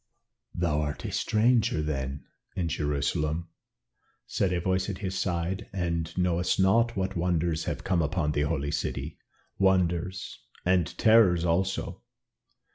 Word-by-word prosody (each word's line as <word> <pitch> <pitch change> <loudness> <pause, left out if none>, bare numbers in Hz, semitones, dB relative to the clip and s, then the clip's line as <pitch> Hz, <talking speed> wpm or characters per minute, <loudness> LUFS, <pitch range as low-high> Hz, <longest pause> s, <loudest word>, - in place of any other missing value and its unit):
"Thou 80 -4 +1
art 75 -1 -4
a - - -3
stranger, 110 -7 +2
then, 70 -2 -3 0.3
in 90 -3 -1
Jerusalem," 75 +2 -1 0.8
said 95 - 0
a 90 - 0
voice 95 +2 0
at 95 - -4
his 95 -1 -4
side, 90 0 -2
"and 85 -3 -2
knowest 90 0 +1
not 115 +4 +3
what 95 +1 -1
wonders 85 -2 0
have - - -3
come 90 -3 +1
upon 75 0 0
the 75 - 0
Holy 75 -1 -1
City - - -3 0.4
wonders 90 -1 +1 0.3
and 90 -2 +3
terrors 105 -7 +5
also." 95 +3 -1
90 Hz, 130 wpm, -28 LUFS, 80-95 Hz, 0.8 s, terrors